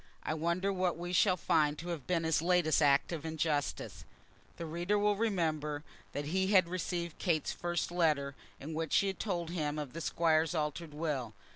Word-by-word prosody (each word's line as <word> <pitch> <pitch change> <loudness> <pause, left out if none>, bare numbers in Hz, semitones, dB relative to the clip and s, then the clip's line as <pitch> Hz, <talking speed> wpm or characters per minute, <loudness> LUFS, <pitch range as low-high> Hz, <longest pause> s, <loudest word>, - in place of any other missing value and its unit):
I - - -1
wonder 170 +5 0
what 180 -3 0
we 175 +1 -5
shall 185 +1 +4
find 150 -3 +2
to 170 +3 -6
have 165 -6 -5
been 170 -2 +1
his 160 -1 +2
latest 175 -3 +3
act 140 +1 +4
of 160 -4 -4
injustice." 160 -2 -2 0.5
The 170 - -5
reader 175 +6 0
will 205 0 +3
remember 160 -9 -1 0.3
that 145 - -3
he 190 +5 +1
had 190 -3 +5
received 170 -1 -3
Kate's 165 -5 +1
first 175 -1 -2
letter, 150 -5 +1 0.2
in 155 +3 -6
which 160 -1 -2
she 200 - +4
had 195 -1 -2
told 175 -5 -2
him 150 -4 -2
of 145 -4 -5
the 165 - -5
Squire's 160 0 +2
altered 150 0 -3
will. 140 -8 -2
165 Hz, 185 wpm, -33 LUFS, 150-180 Hz, 0.5 s, had